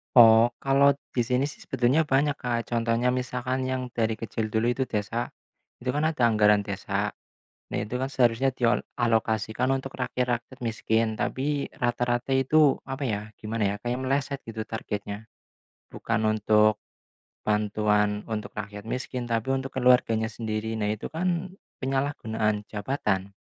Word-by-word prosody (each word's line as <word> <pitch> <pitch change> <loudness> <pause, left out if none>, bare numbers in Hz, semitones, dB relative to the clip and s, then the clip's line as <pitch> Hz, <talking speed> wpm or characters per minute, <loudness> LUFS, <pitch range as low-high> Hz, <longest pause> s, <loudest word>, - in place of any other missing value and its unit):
Oh, 115 -1 +9 0.2
kalau 140 +1 +5 0.2
di 120 -3 0
sini 125 +1 +2
sih 145 +1 -4
sebetulnya 135 +6 +1
banyak, 145 +1 +2
Kak. 120 -2 -2
Contohnya, 115 +1 +2
misalkan 125 +1 -2
yang 130 0 -1
dari 110 -1 0
kecil 110 0 -3
dulu 110 +3 +1
itu 130 +1 -1
desa, 110 +3 -2 0.5
itu 125 +1 -2
kan 150 - 0
ada 155 -6 +2
anggaran 105 -2 +4
desa. 100 +1 -2 0.6
Nah, - - -2
itu 115 +5 -3
kan 135 - -1
seharusnya 130 0 +3
diol 120 -2 +1 0.2
dialokasikan 115 0 +1
untuk 135 0 -7
rakyat 125 -1 0 0.2
miskin, 110 0 0
tapi 140 +6 -1
rata-rata 120 +1 0
itu, 140 +2 +5 0.2
apa 135 +2 -3
ya, 105 -4 -1 0.2
gimana 110 -1 -1
ya, 100 - -2
kayak 125 +2 -1
meleset 140 +1 -1 0.2
targetnya. 105 -1 -5 0.6
Bukan 115 -1 -2 0.2
untuk 105 0 +4 0.7
bantuan 105 0 +1
untuk 110 -2 -4
rakyat 105 0 -6
miskin, 125 +3 -4
tapi 115 +3 +1
untuk 135 0 -3
keluarganya 125 -4 +3
sendiri. 110 0 -3
Nah, 105 -2 -1
itu 105 0 -3
kan 180 +2 -1 0.2
penyalahgunaan 110 -6 -1
jabatan. 105 -3 -2
120 Hz, 140 wpm, -26 LUFS, 110-130 Hz, 0.7 s, Oh